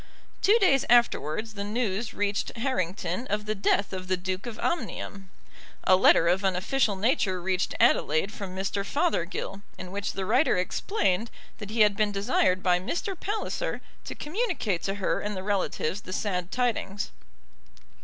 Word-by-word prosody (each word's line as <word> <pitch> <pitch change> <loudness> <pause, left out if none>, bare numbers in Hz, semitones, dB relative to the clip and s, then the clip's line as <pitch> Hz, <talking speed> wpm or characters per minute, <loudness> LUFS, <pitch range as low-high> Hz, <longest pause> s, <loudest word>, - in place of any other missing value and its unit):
Two 420 +4 +5
days 325 - +4
afterwards 225 -3 +2
the 200 -1 -4
news 215 0 -1
reached 205 +3 -2
Harrington 195 -3 -2
of 210 +1 -1
the 215 - 0
death 200 -1 +1
of 185 -1 -5
the 185 0 +1
Duke 185 +3 -4
of 225 -2 -6
Omnium. 200 - -3 0.5
A 185 - +6
letter 175 -2 +5
of 180 +3 +2
an 190 -2 +2
official 215 +3 +1
nature 195 -3 +1
reached 185 +1 -1
Adelaide 155 +6 +3
from 195 -4 -6
Mr. 195 +1 -2
Fothergill, 200 - -1 0.2
in 180 0 -8
which 200 +1 -3
the 195 - -3
writer 250 +2 +3
explained 205 - 0 0.3
that 205 -2 -7
he 220 +1 +1
had 210 -1 +5
been 210 0 +1
desired 190 -2 +1
by 180 -1 +3
Mr. 345 - -3
Palliser 430 +6 -3 0.3
to - - -6
communicate 305 - -1
to 195 - -2
her 200 - 0
and 210 -1 -3
the 185 - -4
relatives 200 -2 -1
the 185 - -7
sad 180 -3 -2
tidings. 225 -5 -1
200 Hz, 165 wpm, -27 LUFS, 185-230 Hz, 0.5 s, A